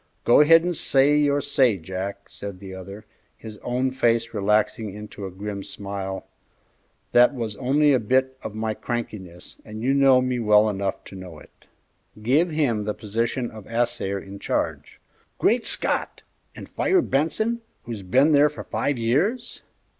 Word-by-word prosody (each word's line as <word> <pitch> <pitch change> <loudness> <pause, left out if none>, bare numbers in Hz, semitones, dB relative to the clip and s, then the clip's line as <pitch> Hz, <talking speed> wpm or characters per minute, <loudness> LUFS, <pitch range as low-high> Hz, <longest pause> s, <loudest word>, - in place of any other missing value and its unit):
"Go 120 - +6
ahead 165 +2 +6
and 175 0 -1
say 140 0 +3
your 145 -1 +2
say, 130 -7 +2
Jack," 95 +3 -6
said 100 -2 -8
the 95 -1 -9
other, 100 +3 -9 0.3
his 110 -2 -10
own 125 +2 -1
face 115 -3 +1
relaxing 105 +1 0
into 105 -1 -8
a - - -7
grim 100 +2 -6
smile; 100 -1 -6 0.9
"that 125 +3 +5
was 115 -4 -4
only 145 +4 +3
a 130 - +3
bit 130 +4 +1
of 105 - -7
my 110 0 -2
crankiness, 105 -7 -6
and 110 +1 -8
you 135 +2 +2
know 135 -2 +5
me 125 -1 -1
well 105 -1 +4
enough 100 -1 -3
to - - -12
know 90 -4 -9
it." - - -19 0.5
"Give 140 +11 +2
him 135 -10 0
the 105 - -2
position 115 +3 -2
of 110 -3 -11
assayer 115 -4 -1
in 100 0 -9
charge." - - -3 0.4
"Great 235 +1 +2
Scott! - - -1 0.3
and - - -9
fire 370 -3 +1
Benson, 220 +12 0 0.2
who's 115 -4 -6
been 130 +11 +3
there 145 0 +5
for 150 - -9
five 140 -2 -1
years?" 175 - -1
115 Hz, 160 wpm, -24 LUFS, 100-135 Hz, 0.9 s, Go